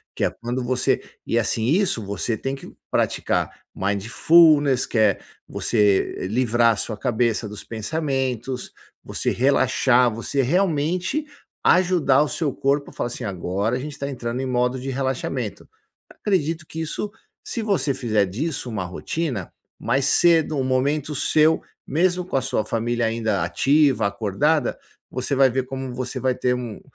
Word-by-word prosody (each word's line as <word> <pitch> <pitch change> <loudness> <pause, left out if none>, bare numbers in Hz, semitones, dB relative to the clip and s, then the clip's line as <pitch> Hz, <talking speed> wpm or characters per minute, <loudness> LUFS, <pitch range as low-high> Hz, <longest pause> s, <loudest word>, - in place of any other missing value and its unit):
que - - -2
é - - +3
quando 120 +2 -4
você 125 0 +1 0.2
e - - +1
assim 110 - -1
isso 155 - +1
você 100 +3 -2
tem 135 +4 -3
que - - -11 0.2
praticar - - 0 0.3
mindfulness 135 - +4
que 115 - -1
é 105 -3 +3 0.3
você 105 -4 +1
livrar 120 0 +3
a - - -4
sua 110 - -2
cabeça 115 -2 0
dos 105 -1 -8
pensamentos, 130 0 -3 0.3
você - - -2
relaxar, 130 -2 +3
você 115 +5 -1
realmente 180 - 0 0.4
ajudar 175 -7 +4
o 150 - -3
seu 150 -6 -1
corpo 140 +1 0
a - - -19
falar - - -2
assim 120 0 -6
"Agora 100 +3 -1
a - - -4
gente 150 +2 -6
está 140 0 -5
entrando 120 -2 -4
em - - -2
modo 125 +1 0
de 135 - -5
relaxamento.". 130 -3 -3 0.4
Acredito 165 -5 -1
que 160 - -7
isso, 200 +6 -4 0.3
se 230 - -4
você 165 -10 +1
fizer 110 -5 +1
disso 125 - -3
uma 100 -5 -3
rotina, 120 - -4 0.3
mais 135 0 +1
cedo, 160 -1 +4
um 135 - +1
momento 140 +3 0
seu, 155 +3 +3 0.3
mesmo 180 +4 +1
com 180 - -5
a - - +1
sua 125 -4 -1
família 115 +1 -1
ainda 115 -1 0
ativa, 140 -4 +3
acordada, 110 +10 0 0.3
você 130 +2 -2
vai 135 -1 +5
ver 130 +2 -1
como 130 -1 -5
você 130 0 -4
vai 130 -1 +1
ter 125 - +1
um 120 -4 -6
130 Hz, 160 wpm, -23 LUFS, 115-150 Hz, 0.4 s, vai